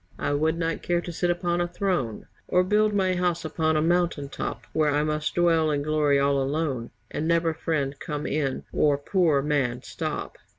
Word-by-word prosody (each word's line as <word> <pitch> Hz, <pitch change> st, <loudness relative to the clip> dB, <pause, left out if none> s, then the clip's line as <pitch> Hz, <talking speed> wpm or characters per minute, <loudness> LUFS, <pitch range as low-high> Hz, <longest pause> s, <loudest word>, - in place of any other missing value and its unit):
I 145 Hz, -, -1 dB
would 160 Hz, +3 st, +1 dB
not 165 Hz, -1 st, -2 dB
care 175 Hz, 0 st, +1 dB
to 175 Hz, -, -6 dB
sit 175 Hz, +1 st, -1 dB
upon 175 Hz, 0 st, 0 dB
a 175 Hz, -, 0 dB
throne, 175 Hz, -, -2 dB, 0.2 s
Or 180 Hz, 0 st, +3 dB
build 210 Hz, +3 st, +3 dB
my 190 Hz, -2 st, +1 dB
house 175 Hz, -2 st, 0 dB
upon 160 Hz, 0 st, +1 dB
a 155 Hz, -, +2 dB
mountain 170 Hz, -4 st, +1 dB
top. -, -, -5 dB
Where 155 Hz, -1 st, +2 dB
I 145 Hz, +1 st, +2 dB
must 150 Hz, 0 st, -1 dB
dwell 165 Hz, -2 st, +3 dB
in 145 Hz, -1 st, 0 dB
glory 150 Hz, -2 st, +2 dB
all 140 Hz, 0 st, +2 dB
alone 135 Hz, -4 st, -1 dB, 0.2 s
And 155 Hz, -, -2 dB
never 165 Hz, -1 st, +2 dB
friend 145 Hz, -4 st, -1 dB
come 150 Hz, -1 st, -4 dB
in 140 Hz, -3 st, -1 dB
or 145 Hz, -2 st, +3 dB
poor 155 Hz, -2 st, +2 dB
man 135 Hz, -4 st, 0 dB
stop. -, -, -5 dB
155 Hz, 195 wpm, -26 LUFS, 145-175 Hz, 0.2 s, Or